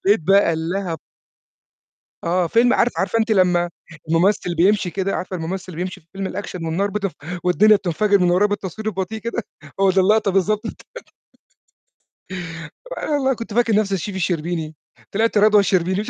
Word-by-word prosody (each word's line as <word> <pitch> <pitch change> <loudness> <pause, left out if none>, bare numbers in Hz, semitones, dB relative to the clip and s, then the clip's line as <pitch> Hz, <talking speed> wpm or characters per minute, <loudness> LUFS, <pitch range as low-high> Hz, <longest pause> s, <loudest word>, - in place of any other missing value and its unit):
لقيت 205 0 +4
بقى 195 +1 +4
اللهب 165 +1 -3 1.3
آه، 175 +1 +1
فيلم 240 +6 +3
عارف 245 - +2
عارفة 210 +4 0
أنتِ 225 0 0
لمّا 180 -3 +3 0.4
المُمثّل 175 +1 +2
بيمشي 185 +2 +3
كده، 195 +2 -2
عارفة 185 0 -4
المُمثّل 180 +2 -4
اللي 180 - -9
بيمشي 185 -1 -7
في 160 - -37
فيلم 195 0 -3
الأكشن، 185 -4 -6
والنار 180 +5 0
بتف 200 -1 -2 0.3
والدنيا 210 +4 +5
بتنفجر 200 +2 +1
من 180 -1 +3
ورّاه 185 +4 +4
بالتصوير 205 +1 -4
البطيء 205 +1 -3
كده، 235 +1 -4 0.4
هو 195 0 +4
ده 190 +1 +3
اللقطة 205 +1 +3
بالضبط. 205 +3 +1 2.3
أنا - - -4
والله 270 -2 +2
كنت 230 -2 -7
فاكر 230 -1 +2
نفسي 200 -2 +1
الchef 190 +3 -5
الشربيني، 165 -3 -2 0.4
طلعت 220 +2 +1
رضوى 210 0 +6
الشربيني. 190 0 +1
ف 225 - -7
195 Hz, 160 wpm, -21 LUFS, 180-210 Hz, 2.3 s, رضوى